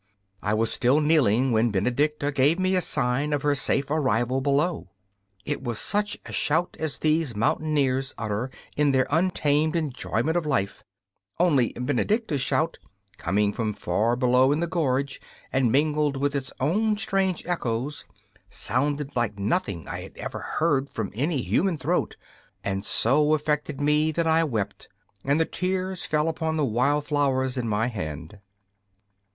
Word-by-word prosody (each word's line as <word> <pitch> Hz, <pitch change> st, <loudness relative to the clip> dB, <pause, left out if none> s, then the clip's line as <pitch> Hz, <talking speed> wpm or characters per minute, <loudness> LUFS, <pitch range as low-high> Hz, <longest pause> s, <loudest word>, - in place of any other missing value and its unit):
I 105 Hz, +1 st, 0 dB
was 115 Hz, +1 st, 0 dB
still 130 Hz, +4 st, +3 dB
kneeling 135 Hz, -5 st, +3 dB
when 115 Hz, +1 st, +3 dB
Benedicta 140 Hz, +8 st, 0 dB
gave 145 Hz, +4 st, +3 dB
me 185 Hz, 0 st, +1 dB
a 185 Hz, -, +3 dB
sign 140 Hz, 0 st, 0 dB
of 145 Hz, -, -1 dB
her 145 Hz, -1 st, +3 dB
safe 140 Hz, 0 st, 0 dB
arrival 130 Hz, -4 st, +1 dB
below. 145 Hz, -, 0 dB, 0.6 s
It 145 Hz, -, -3 dB
was 120 Hz, -4 st, -2 dB
such 205 Hz, -, 0 dB
a -, -, -8 dB
shout 165 Hz, +4 st, +1 dB
as 160 Hz, -3 st, -3 dB
these 155 Hz, -5 st, +1 dB
mountaineers 135 Hz, +2 st, 0 dB
utter 110 Hz, +3 st, -2 dB, 0.3 s
in 145 Hz, -1 st, +2 dB
their 130 Hz, -1 st, +3 dB
untamed 155 Hz, -2 st, +2 dB
enjoyment 150 Hz, -1 st, -1 dB
of 170 Hz, -3 st, 0 dB
life 100 Hz, -9 st, -1 dB, 0.6 s
only 145 Hz, -9 st, +3 dB
Benedicta's 145 Hz, -, 0 dB
shout, 160 Hz, +5 st, 0 dB, 0.4 s
coming 105 Hz, +1 st, +1 dB
from 110 Hz, -2 st, -2 dB
far 115 Hz, +4 st, 0 dB
below 125 Hz, +1 st, +3 dB
in 150 Hz, -, +1 dB
the 170 Hz, -, +1 dB
gorge, 140 Hz, -5 st, -1 dB, 0.3 s
and 130 Hz, -3 st, +2 dB
mingled 150 Hz, +1 st, +2 dB
with 140 Hz, +1 st, 0 dB
its 135 Hz, -1 st, -3 dB
own 210 Hz, +10 st, +1 dB
strange 195 Hz, -4 st, 0 dB
echoes, 130 Hz, -4 st, -2 dB, 0.5 s
sounded 145 Hz, +2 st, -1 dB
like 115 Hz, -4 st, -1 dB
nothing 100 Hz, -, -1 dB
I -, -, -5 dB
had -, -, -12 dB
ever -, -, -5 dB
heard 145 Hz, -4 st, 0 dB
from 110 Hz, -3 st, -4 dB
any 140 Hz, -, -1 dB
human 180 Hz, -2 st, +1 dB
throat, -, -, -1 dB, 0.5 s
and 95 Hz, 0 st, -2 dB
so 150 Hz, +8 st, +3 dB
affected 150 Hz, -1 st, -2 dB
me 150 Hz, +2 st, +2 dB
that 170 Hz, +1 st, 0 dB
I 165 Hz, 0 st, +3 dB
wept, 110 Hz, -9 st, -4 dB, 0.3 s
and 140 Hz, +3 st, +2 dB
the 160 Hz, -, +3 dB
tears 185 Hz, +1 st, -2 dB
fell 150 Hz, +1 st, +1 dB
upon 160 Hz, -1 st, -1 dB
the 150 Hz, -, +2 dB
wild 140 Hz, +5 st, +1 dB
flowers 135 Hz, -3 st, +1 dB
in 125 Hz, -3 st, -2 dB
my 105 Hz, +1 st, +1 dB
hand. 85 Hz, -, -5 dB
145 Hz, 155 wpm, -25 LUFS, 125-155 Hz, 0.6 s, still